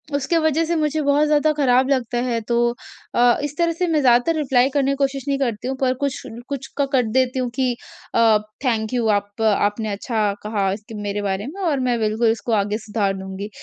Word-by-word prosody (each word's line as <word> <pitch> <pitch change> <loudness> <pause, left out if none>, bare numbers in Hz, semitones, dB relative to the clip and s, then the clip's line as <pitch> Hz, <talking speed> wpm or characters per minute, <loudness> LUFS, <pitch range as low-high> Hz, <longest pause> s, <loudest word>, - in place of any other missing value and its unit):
उसके 285 +4 +1
वजह 315 +1 +1
से 340 +1 -1
मुझे 310 -1 0
बहुत 285 +1 +3
ज़्यादा 300 +1 +3
खराब 260 -3 +3
लगता 250 -3 0
है। 240 -2 -1
तो 235 +2 -1 0.6
अ, 240 0 +4
इस 295 0 -4
तरह 340 -1 +2
से 355 +2 -1
मैं 315 -2 +2
ज़्यादातर 250 +5 +4
रिप्लाई 260 -3 +2
करने 275 -1 +1
की - - 0
कोशिश 275 -1 -1
नहीं 275 -1 +1
करती 240 -3 -2
हूँ। 265 - -2
पर 255 -1 +2
कुछ 280 -2 -1
ल 230 +2 -9
कुछ 270 -1 -4
का 285 - +2
कर 255 - +4
देती 260 +1 +1
हूँ 250 -1 -1
कि 260 -2 +1 0.4
अ, 225 -2 +5 0.3
थैंक 225 -2 0
यू 235 -2 +1
आप 205 +1 -1
आपने 210 0 +1
अच्छा 210 0 -1
कहा 205 -3 0
इसके 215 +2 -9
मेरे 205 0 -3
बारे 200 +2 -2
में 385 +7 -7
और 310 -6 +1
मैं 245 -2 0
बिल्कुल 220 +1 +1
इसको 230 +1 -4
आगे 205 0 +1
सुधार 210 -2 -1
दूँगी। 190 +2 -6
245 Hz, 220 wpm, -21 LUFS, 215-280 Hz, 0.6 s, अ